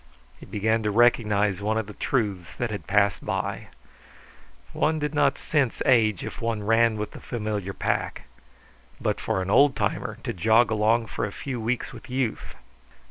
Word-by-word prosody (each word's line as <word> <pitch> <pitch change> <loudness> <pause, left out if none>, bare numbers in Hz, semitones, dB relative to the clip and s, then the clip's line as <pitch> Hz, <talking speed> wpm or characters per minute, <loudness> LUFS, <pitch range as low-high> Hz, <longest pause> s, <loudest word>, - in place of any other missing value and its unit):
He - - -12
began 110 +2 0
to 105 - 0
recognize 105 -3 +3
one 110 +2 0
of 110 - -1
the 105 - -10
truths 100 -11 -2
that 120 -2 -2
had 105 - -6
passed 100 -1 +2
by: - - -3 1.1
One 155 +1 +1
did 150 -1 -2
not 150 - +2
sense 140 -6 0
age 110 -7 +3
if - - -7
one 115 -2 -2
ran 115 +1 +3
with 105 0 -4
the - - -10
familiar 105 -5 -3
pack. - - -2 0.8
But - - -1
for 95 - -1
an 95 - -3
old 140 +4 +5
timer - - -2
to - - -3
jog 110 +5 +3
along 110 +2 +2
for 115 - -5
a 105 - -2
few 125 +2 -5
weeks 120 +2 -2
with - - -12
youth! 125 -3 -2
110 Hz, 175 wpm, -25 LUFS, 105-120 Hz, 1.1 s, old